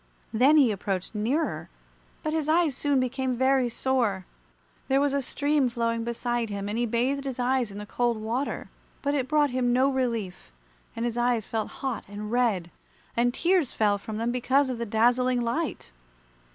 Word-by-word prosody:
Then 265 +7 +5
he 265 -6 +5
approached 195 -1 -3
nearer, 245 +10 -1 0.5
but 310 -1 -1
his 310 -2 -1
eyes 320 -4 +3
soon 285 0 +1
became 255 0 -1
very 260 -1 +3
sore. 230 -7 0 0.6
There 270 +1 +3
was 285 -1 +1
a 280 - +1
stream 285 0 +1
flowing 230 -1 -1
beside 235 0 -2
him, 200 -1 -4
and 205 - -3
he 240 +1 0
bathed 255 +5 0
his 265 -3 -4
eyes 250 -1 +1
in 200 - -9
the 210 - -6
cold 240 +1 0
water, 235 +6 -3 0.3
but 285 0 +1
it 265 -3 0
brought 295 -2 +2
him 250 -1 +1
no 260 +3 +3
relief, 230 - -2 0.4
and 230 - -2
his 240 0 -2
eyes 240 -2 +1
felt 220 -1 -3 0.2
hot 255 -5 -2
and 210 +2 -6
red, 220 -9 +1 0.4
and 245 +1 +3
tears 345 +1 +1
fell 205 -2 +2
from 215 +1 -6
them 230 +2 -1
because 260 +2 +2
of 240 - -5
the 235 - -3
dazzling 245 +3 +2
light. 235 - -2
245 Hz, 180 wpm, -27 LUFS, 225-270 Hz, 0.6 s, Then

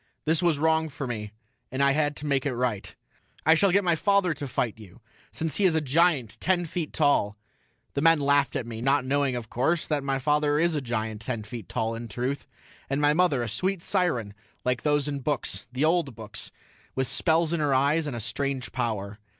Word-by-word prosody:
This 160 +2 +2
was 170 -4 +2
wrong 160 +1 +2
for 140 -1 -5
me, 110 -4 -4 0.4
and 130 +2 0
I 140 - +5
had 145 0 +1
to 150 - -7
make 140 -1 +1
it 130 - -2
right. 120 -5 -2 0.5
"I 160 - +7
shall 190 +4 +3
get 200 +3 +3
my 175 -2 +3
father 200 0 +2
to 145 -1 -6
fight 115 -3 -2
you, 105 0 -14 0.3
since 160 -1 -1
he 205 - +1
is 180 -4 +4
a - - +4
giant 150 -5 +2
ten 180 -1 +1
feet 165 -1 -4
tall." 140 -9 +2 0.6
The 140 - -1
men 165 0 +5
laughed 140 0 +2
at 125 - -1
me, 115 -1 -6
not 135 +1 +2
knowing, 140 -1 +1
of 115 -2 -6
course, 155 +7 +1
that 150 -3 -1
my 135 -1 0
father 150 +2 +2
is 165 +1 +2
a 150 - 0
giant 110 -3 -3
ten 115 -2 -3
feet 110 0 -8
tall 115 -2 -1
in 115 +1 -6
truth, 125 +6 -3 0.4
and 135 +1 0
my 145 0 +4
mother 155 -7 +2
a - - -3
sweet 185 - -2
siren 155 - 0 0.3
like 125 -1 +1
those 145 -1 +1
in 145 -1 -2
the - - -7
books, 145 -2 -2
the 130 +4 +1
old 160 -6 +1
books, 110 -2 -6 0.5
with 130 - +1
spells 165 0 +2
in 170 - 0
her 145 -3 +2
eyes 145 +4 +2
and 140 - -3
a - - -4
strange 130 +4 -3
power. 110 -4 -3
140 Hz, 220 wpm, -27 LUFS, 120-160 Hz, 0.6 s, I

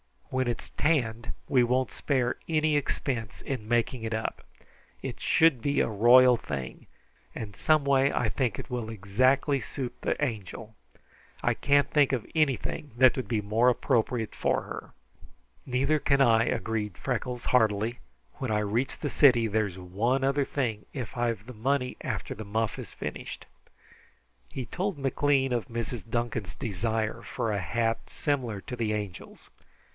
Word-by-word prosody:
When 130 -1 0
it's 120 - -3
tanned 120 -7 0 0.2
we 135 -4 +5
won't 125 +1 +1
spare 130 -4 0
any 155 -1 +2
expense 125 -5 -3
in 125 -6 -4
making 120 +1 0
it 115 0 -2
up. 110 0 -3 0.6
It - - -5
should 160 -7 +4
be 140 +4 +1
a - - +1
royal 120 +4 +6
thing, 70 - -6 0.5
and 105 -2 -6
some 155 -2 +3
way 140 0 +3
I 115 - +1
think 120 -3 -1
it - - -7
will 120 -3 -3
exactly 130 +7 +2
suit 130 0 -5
the - - -1
Angel. 110 -3 -4 0.7
I - - +3
can't 145 0 +2
think 145 -3 +4
of 120 -5 -1
anything 150 -1 0
that 130 0 +6
would 130 -5 -3
be 110 -1 0
more 110 +4 +3
appropriate 120 -2 0
for - - +1
her." - - -8 0.8
"Neither 135 +4 +2
can 140 -1 +2
I," 115 -3 +5
agreed 105 -6 -2
Freckles 125 -1 -3
heartily. 110 -1 +2 0.4
"When 130 -4 -4
I 105 - +2
reach 110 +5 -1
the 145 - -2
city 120 -7 +5
there's 100 -3 -1
one 105 +9 0
other 140 +1 +2
thing, 115 -8 -2
if 125 -6 -5
I've 115 -3 -1
the 125 - -9
money 125 +3 -1
after - - -3
the 110 - -8
muff 110 +1 -1
is - - -8
finished." - - -6 1.0
He 130 - -5
told 185 - -3
McLean 135 -1 +1
of 120 -1 -1
Mrs. 115 -1 -5
Duncan's 115 -4 -2
desire 110 -1 -2
for 115 - -3
a 100 - 0
hat 115 +5 -1
similar 125 -8 -2
to 125 - -6
the 110 -2 0
Angel's. 105 -5 -7
120 Hz, 160 wpm, -28 LUFS, 110-135 Hz, 1.0 s, royal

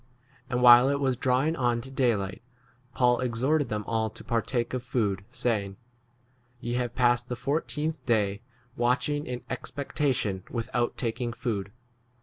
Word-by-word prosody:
And 125 0 0
while 120 +2 +9
it 140 0 +1
was 135 -2 +1
drawing 130 +5 +1
on 120 -4 +1
to 135 +2 -7
day 125 -4 +2
light, 95 0 -5 0.5
Paul 125 -1 +3
exhorted 130 +3 +1
them 105 -1 -2
all 110 0 0
to - - -12
partake 120 +1 -1
of 130 - -1
food, 105 -6 -1
saying, 105 -6 -1 0.8
Ye 120 0 -3
have 120 -1 -2
passed 120 -1 +2
the 125 - -2
fourteenth 150 +2 -2
day 105 -3 +1 0.3
watch 125 +4 +1
ing 145 0 -2
in 125 0 -5
expectation 130 -7 -2
without 120 0 -2
taking 120 0 -2
84 115 - -9
food. 100 -4 -2
120 Hz, 155 wpm, -27 LUFS, 115-130 Hz, 0.8 s, while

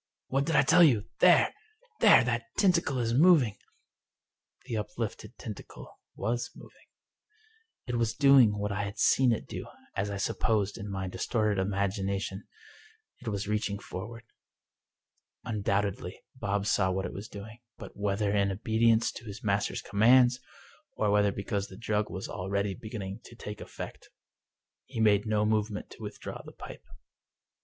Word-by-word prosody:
" - - -62
What 135 +2 0
did 165 - +1
I - - +6
tell 180 +6 +5
you? 115 -9 +4
There— - - +5 0.5
there - - +7
I - - 0
That - - -1
tentacle 170 -8 +2
is 115 -2 0
moving." 140 - +5 1.1
The 120 -3 -4
uplifted 105 -3 -5
tentacle - - -10 0.2
was 120 +4 -2
moving. - - -16 1.0
It 125 -2 -2
was 115 -1 0
doing 135 -7 +6
what 105 0 -2
I 100 +1 -1
had 100 +1 -5
seen 130 -2 +4
it 115 - -1
do, - - -7 0.3
as 100 - -1
I 100 - -3
supposed, 100 +1 0
in 100 +1 -6
my 95 -1 -3
distorted 105 +1 0
imagination 100 0 -2 0.7
—it 125 - -13
was 100 -2 -2
reaching 105 -1 -1
forward. 110 +4 -8 1.2
Undoubtedly 100 -3 -2
Bob 105 -4 -2
saw 95 -2 +2
what 95 +1 -1
it - - -5
was 100 +3 -7
doing; 110 +3 -10 0.2
but, - - -10
whether 100 0 0
in 100 -1 +2
obedience 110 +2 +2
to - - -10
his 100 -1 -8
master's 100 -1 0
com 100 - -6
mands, 125 +2 +6 0.6
or 105 -1 +1
whether 105 0 +3
because 100 0 -3
the 95 - -12
drug 105 -2 -1
was 95 +3 -5
already 100 +2 -2
beginning 100 -1 -6
to 120 - -13
take 105 -2 -8
effect, - - -9 0.8
he - - -7
made 105 -1 +3
no 105 -1 +2
movement 105 -1 -1
to - - -13
withdraw 105 -1 -7
the - - -12
pipe. - - -11
105 Hz, 160 wpm, -29 LUFS, 100-115 Hz, 1.2 s, there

